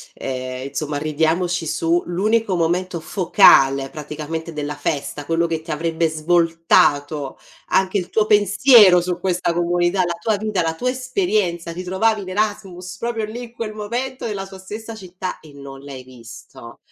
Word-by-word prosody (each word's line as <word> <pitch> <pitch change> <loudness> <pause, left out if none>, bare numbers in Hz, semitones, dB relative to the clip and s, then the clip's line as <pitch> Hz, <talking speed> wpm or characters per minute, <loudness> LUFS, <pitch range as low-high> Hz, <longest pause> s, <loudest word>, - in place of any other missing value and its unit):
ehm, 130 0 -5
insomma, 145 +1 -3
ridiamoci 160 +3 0
su. 165 +2 0
L'unico 205 +3 +1
momento 175 +1 -1
focale, 140 -8 +4
praticamente, 155 +2 -6
della 150 -1 -4
festa, 145 0 -3
quello 165 +2 +1
che 160 -1 -3
ti 160 - -16
avrebbe 165 +1 0
svoltato, 160 -3 +1 0.3
anche, 190 +2 +1
il 180 - -6
tuo 215 - +2
pensiero 205 -2 +6
su 180 0 -3
questa 180 -2 0
comunità, 175 +2 +1
la 170 -1 -3
tua 220 -2 0
vita, 210 -3 -1
la 160 0 -1
tua 250 +9 -1
esperienza 215 - -1
ti 180 +2 -6
trovavi 205 +4 +1
in 185 - -8
Erasmus, 190 -2 -3
proprio 230 -2 -2
lì, 235 +3 -7
in 235 - -11
quel 225 -2 -5
momento, 240 +5 -4
nella 200 -4 -4
sua 190 0 -11
stessa 220 +4 -8
città, 185 -2 -7
e 155 -2 -16
non 140 -1 -11
l'hai 135 -2 -9
visto. 115 -1 -13
175 Hz, 160 wpm, -20 LUFS, 155-205 Hz, 0.3 s, pensiero